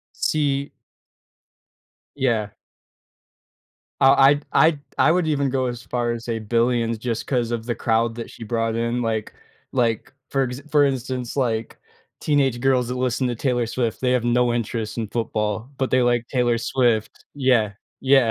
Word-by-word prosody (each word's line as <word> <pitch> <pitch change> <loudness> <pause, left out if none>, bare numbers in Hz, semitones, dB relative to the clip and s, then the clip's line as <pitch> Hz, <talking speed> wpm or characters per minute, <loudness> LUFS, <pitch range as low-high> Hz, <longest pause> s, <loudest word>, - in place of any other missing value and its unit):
See 140 -2 0 1.5
Yeah. 120 -6 +1 1.5
Uh, 135 +1 +7
I'd 145 +2 +5
I'd 160 -2 +4 0.2
I 155 - +5
would 175 -1 +1
even 140 -3 +1
go 130 -1 0
as 120 -1 -4
far 120 -1 -1
as 115 0 -6
say 115 -1 -2
billions 115 +1 +1
just 115 0 -3
'cause 120 -3 0
of 115 -1 -2
the 120 - -1
crowd 115 0 +1
that 115 - -6
she 115 - -10
brought 115 0 -1
in. 115 +1 -1
Like 110 -2 -2 0.4
like, 120 -2 0 0.2
for 135 -1 +1
ex 125 +1 -5
for 145 -1 +5
instance, 130 -2 -2
like, 115 -4 -1 0.4
teenage 135 -5 +1
girls 130 -2 +2
that 125 - -3
listen 125 0 0
to 120 - -1
Taylor 120 -1 0
Swift, 115 -1 -2
they 125 -1 +1
have 125 -2 +1
no 120 0 +2
interest 115 -1 -3
in 110 - -2
football, 110 +1 -2
but 130 -1 0
they 130 - +3
like 120 -1 +1
Taylor 120 -3 +1
Swift. 115 -3 0
Yeah, 125 -7 +2 0.3
yeah. 135 -3 +4
120 Hz, 165 wpm, -22 LUFS, 115-130 Hz, 1.5 s, Uh